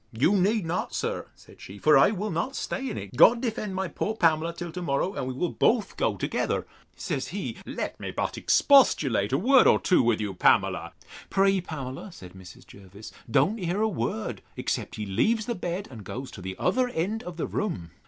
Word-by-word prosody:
You 130 - +2
need 200 +1 +2
not, 165 +2 -3
sir, - - -3
said - - -18
she; 100 - -10
for 155 +9 +4
I 135 - +6
will 210 0 -3
not 215 - -2
stay 270 -1 -3
in - - -5
it. - - -8
God 235 +1 +7
defend 220 -5 -3
my 190 0 -1
poor 215 +5 -3
Pamela 165 -3 +2
till 170 0 -7
to 180 +2 -6
morrow, 170 +4 -1
and 130 - -4
we 130 - -3
will 175 +6 -1
both 225 -3 +1
go - - 0
together.—Says - - -3
he, - - -5
let - - -4
me - - -5
but - - -3
expostulate 140 - +4
a 135 - +2
word 255 - +5
or - - +5
two 185 - +3
with 120 -2 +2
you, 105 -2 -3
Pamela. 90 - +2 0.4
Pray, 195 -1 +3
Pamela, 145 +2 -7
said 90 - -12
Mrs. 95 -1 -13
Jervis, 100 +2 -13 0.2
don't 170 - +2
hear 180 +1 -2
a - - +3
word, 120 - -3 0.2
except - - -3
he 105 - -4
leaves 215 - +1
the 235 - -2
bed, 180 0 -4
and 110 -5 -9
goes 130 +7 -7
to 95 - -10
the 95 +1 -5
other 255 0 +1
end 210 +3 -2
of 175 -2 -8
the - - -2
room. 95 - -3
175 Hz, 205 wpm, -26 LUFS, 125-210 Hz, 0.4 s, God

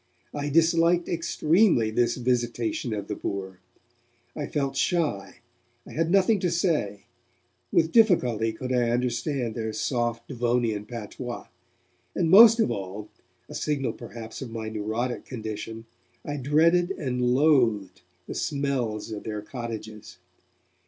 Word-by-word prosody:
I 145 0 -3
disliked 165 +2 +3
extremely 165 - +2
this 120 +2 +1
visitation 120 -1 -1
of 105 -2 -4
the 105 - -3
poor. 95 -2 -5 0.8
I 145 - -4
felt 140 -2 -2
shy, 140 - -1 0.4
I - - -12
had 165 +1 0
nothing 195 +3 +4
to 180 - 0
say, 155 - 0 0.7
with 160 0 +2
difficulty 125 - +3
could 125 +3 -4
I 120 -2 +2
understand 120 +1 -1
their 110 0 -3
soft 120 -2 -2
Devonian 120 -4 -1
patois, 120 +2 -7 0.7
and 165 -2 +1
most 225 +3 +9
of 130 - +2
all 100 0 -5 0.4
a - - -10
signal 135 -6 -1
perhaps 115 0 -9
of 130 - -5
my 110 -1 -5
neurotic 110 +3 -3
condition 110 -1 -6 0.4
I 145 0 -3
dreaded 165 +6 +3
and 130 -9 -3
loathed 120 -10 +2 0.2
the - - -6
smells 130 -7 -2
of 105 -1 -6
their 105 -1 -5
cottages. 110 -4 -7
120 Hz, 130 wpm, -26 LUFS, 110-150 Hz, 0.8 s, most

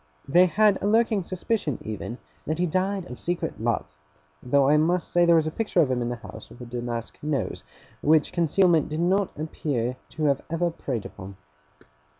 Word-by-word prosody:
They 180 +6 +5
had 210 +2 +3
a - - 0
lurking 220 -1 +3
suspicion 185 - -2
even, 110 +2 -5 0.3
that 155 +1 -1
he 180 - +1
died 185 +2 -1
of 125 - -9
secret 175 -9 -3
love; 115 -10 -1 0.5
though 135 +2 +3
I 150 - +5
must 170 +3 +2
say 175 0 +4
there 170 0 +6
was 160 -1 +3
a 155 - -2
picture 210 -1 -1
of 145 -6 +4
him 125 -1 0
in 120 - -1
the 120 - -2
house 115 - -11
with - - -14
a 125 - -8
damask 120 -1 -5
nose, 150 -3 -2 0.4
which 155 0 +3
concealment 170 -1 +3
did 155 +1 -3
not 190 +3 +2
appear 135 -5 -2
to 155 - -5
have 140 -2 +2
ever 170 +1 0
preyed 125 -9 -4
upon. 95 +1 -10
155 Hz, 190 wpm, -25 LUFS, 125-180 Hz, 0.5 s, there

